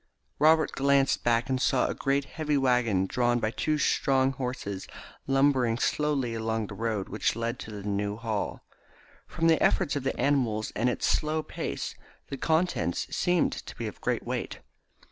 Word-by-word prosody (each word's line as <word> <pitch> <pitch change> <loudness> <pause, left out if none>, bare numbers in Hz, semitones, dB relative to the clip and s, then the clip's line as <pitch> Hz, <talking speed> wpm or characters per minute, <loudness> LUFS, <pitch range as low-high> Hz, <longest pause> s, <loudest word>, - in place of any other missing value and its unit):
Robert 155 +1 +5
glanced 140 0 +2
back 120 0 +2
and 130 -1 -1
saw 130 -1 +2
a - - -1
great 140 0 0
heavy 150 -2 -1
waggon 125 -8 +2
drawn 120 +4 +1
by 110 -2 -1
two 155 +5 0
strong 135 -2 +2
horses 125 -8 -5 0.4
lumbering 135 -4 +3
slowly 140 -3 0
along 110 -1 -1
the 100 - -8
road 110 -2 -2
which 105 - -1
led 115 +2 -3
to - - -8
the 105 -2 -7
New 100 0 -1
Hall. 110 -2 -3 0.6
From 165 - -2
the 165 -1 +4
efforts 175 -7 +2
of 145 - -1
the 135 - -3
animals 120 -7 +1
and 120 +3 +2
its 125 - -1
slow 155 +1 +1
pace - - -4 0.4
the 140 - -4
contents 160 - 0
seemed 175 -2 +2
to - - -8
be - - -5
of - - -7
great - - -1
weight. - - -3
125 Hz, 170 wpm, -28 LUFS, 110-140 Hz, 0.6 s, Robert